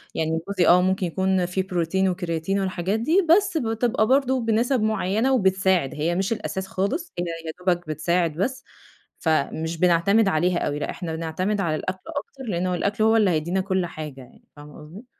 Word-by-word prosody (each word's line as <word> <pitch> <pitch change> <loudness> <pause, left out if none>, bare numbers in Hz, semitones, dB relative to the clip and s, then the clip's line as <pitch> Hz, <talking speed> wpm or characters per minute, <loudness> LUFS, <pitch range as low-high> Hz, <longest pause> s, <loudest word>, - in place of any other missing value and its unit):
يعني 160 0 0
جوزي 190 -4 +1
آه 180 +1 +6
ممكن 190 +1 +1
يكون 190 +1 0
في 180 +2 -1
بروتين 190 +1 0
وكرياتين 175 +1 -2
والحاجات، 190 +2 -1
دي 330 - +2
بس 375 0 +4
بتبقى 225 -2 0
برضه 265 0 +2
بنسب 230 +3 +1
معينة 215 +3 +1
وبتساعد 190 - +2
هي 160 +4 -1
مش 195 +4 0
الأساس 190 -3 -4
خالص 200 - -2
هي 175 - -1 0.2
يا - - -2
دوبك 175 -2 0
بتساعد 165 +2 0
بس، 250 - -2 0.6
فمش 160 +1 -1
بنعتمد 180 +5 +3
عليها 175 0 +1
أوي. 145 0 -2
لا 145 - -3
إحنا 165 -3 -5
بنعتمد 185 +6 -2
على 165 -4 0
الأكل 185 +4 -4
أكتر 285 -3 -6
لأنه 180 +1 -1
الأكل 200 +4 -1
هو 220 +1 +4
اللي 210 -3 +4
هيدينا 170 +4 0
كل 190 -1 -1
حاجة 150 -5 -8
يعني 125 - -17
فاهمة 145 0 -12
قصدي؟ 165 +10 -12
185 Hz, 180 wpm, -24 LUFS, 170-215 Hz, 0.6 s, آه